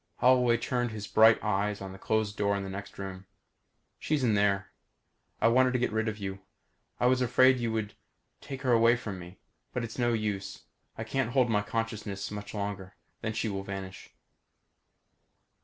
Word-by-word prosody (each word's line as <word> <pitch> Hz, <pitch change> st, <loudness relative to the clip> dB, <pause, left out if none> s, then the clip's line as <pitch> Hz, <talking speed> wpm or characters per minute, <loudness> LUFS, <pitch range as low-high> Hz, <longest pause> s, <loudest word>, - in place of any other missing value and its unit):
Holloway 125 Hz, -2 st, +4 dB
turned 120 Hz, +1 st, -1 dB
his 110 Hz, -2 st, -6 dB
burning 110 Hz, +1 st, +6 dB
eyes 105 Hz, -1 st, 0 dB
on 95 Hz, -1 st, -7 dB
the 95 Hz, -, -11 dB
closed 110 Hz, 0 st, 0 dB
door 100 Hz, -1 st, +1 dB
to 100 Hz, -, -3 dB
the 95 Hz, -, -6 dB
next 100 Hz, +1 st, -8 dB
room. 95 Hz, -1 st, -7 dB, 0.7 s
"She's 150 Hz, -3 st, 0 dB
in 115 Hz, -3 st, +3 dB
there. 100 Hz, -1 st, +1 dB, 0.7 s
I -, -, +4 dB
wanted 130 Hz, +2 st, +4 dB
to -, -, +2 dB
get 125 Hz, -, 0 dB
rid 110 Hz, +1 st, 0 dB
of 110 Hz, -1 st, -2 dB
you. 95 Hz, -2 st, -5 dB, 0.6 s
I -, -, +1 dB
was 130 Hz, +1 st, +4 dB
afraid 130 Hz, +1 st, +5 dB
you 115 Hz, -1 st, -1 dB
would 105 Hz, -2 st, -2 dB, 0.5 s
take 135 Hz, 0 st, -7 dB
her 130 Hz, -, +2 dB
away 115 Hz, 0 st, +5 dB
from 105 Hz, -6 st, -6 dB
me. 90 Hz, +1 st, -11 dB, 0.4 s
But 125 Hz, -, -2 dB
it's 115 Hz, +2 st, -6 dB
no 120 Hz, -1 st, +2 dB
use. 105 Hz, -3 st, -3 dB, 0.3 s
I 110 Hz, -, -3 dB
can't 120 Hz, +1 st, -1 dB
hold 125 Hz, -3 st, +3 dB
my 105 Hz, -1 st, +3 dB
consciousness 105 Hz, -2 st, -4 dB
much 105 Hz, 0 st, -7 dB
longer. 100 Hz, -2 st, -4 dB, 0.3 s
Then 110 Hz, 0 st, -2 dB
she 110 Hz, -, -1 dB
will 100 Hz, -2 st, -3 dB
vanish." 95 Hz, -1 st, -7 dB
110 Hz, 185 wpm, -29 LUFS, 100-120 Hz, 0.7 s, burning